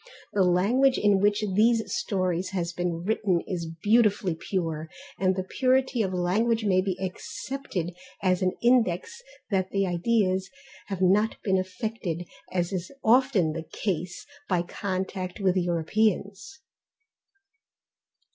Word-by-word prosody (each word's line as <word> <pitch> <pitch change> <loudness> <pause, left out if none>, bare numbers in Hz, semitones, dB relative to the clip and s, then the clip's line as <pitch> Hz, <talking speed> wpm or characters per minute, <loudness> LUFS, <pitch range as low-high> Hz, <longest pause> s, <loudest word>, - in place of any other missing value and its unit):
The 205 - +2
language 210 +10 +3
in 205 -2 +3
which 205 +2 +2
these 225 +3 +4
stories 185 -6 -1
have 175 -1 -2
been 175 -1 -2
written 195 -3 +1
is 170 -3 -4
beautifully 205 +2 +2
pure, 160 -2 -3 0.3
and 190 -1 +2
the 185 - -2
purity 260 +3 +1
of 190 -3 0
language 215 +6 +1
may 185 -2 +3
be 185 -1 -2
accepted 190 0 -4 0.3
as 185 -1 +2
an 185 -1 +1
index 240 - +2 0.3
that 190 -1 +1
the 195 0 +1
ideas 185 +1 +1 0.4
have 195 -2 -2
not 205 +4 +3
been 190 -2 +2
affected, 185 -2 -4 0.2
as 175 +1 -1
is 185 -1 -4
often 225 - +3
the 160 0 -6
case, 180 -3 -3 0.2
by 180 -3 +2
contact 185 0 -4
with 190 -2 +2
Europeans. 195 - 0
190 Hz, 130 wpm, -27 LUFS, 180-215 Hz, 0.4 s, these